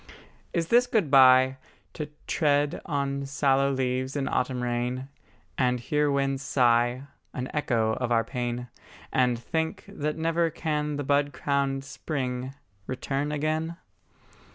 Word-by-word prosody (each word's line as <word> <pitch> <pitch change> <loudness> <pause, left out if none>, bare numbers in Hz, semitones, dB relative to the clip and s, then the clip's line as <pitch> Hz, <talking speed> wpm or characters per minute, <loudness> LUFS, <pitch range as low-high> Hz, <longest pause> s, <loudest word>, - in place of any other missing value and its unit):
Is 165 -1 -1
this 245 +1 +5
good 195 -11 +1
bye, 130 -1 +7 0.4
To 150 -1 -5 0.2
tread 145 -2 +1
on 140 -2 -1
sallow 140 0 +2
leaves 130 0 -1
in 140 -1 -1
autumn 125 -1 -1
rain, 125 +2 -2 0.5
And 125 -1 +2
hear 150 +4 +1
winds 135 -1 0
sigh 120 -2 +2 0.3
An 130 0 -4
echo 115 -7 +1
of 125 -2 -2
our 115 -1 +3
pain; 120 0 -3 0.5
And 125 -2 +3
think 160 +7 -3
that 150 +1 -3
never 165 +1 +1
can 150 -2 -2
the 145 - -3
bud 145 +1 +1
crowned 140 -1 0
spring 130 -1 -4 0.3
Return 135 +3 -2
again? 155 +3 -1
135 Hz, 130 wpm, -27 LUFS, 125-150 Hz, 0.5 s, bye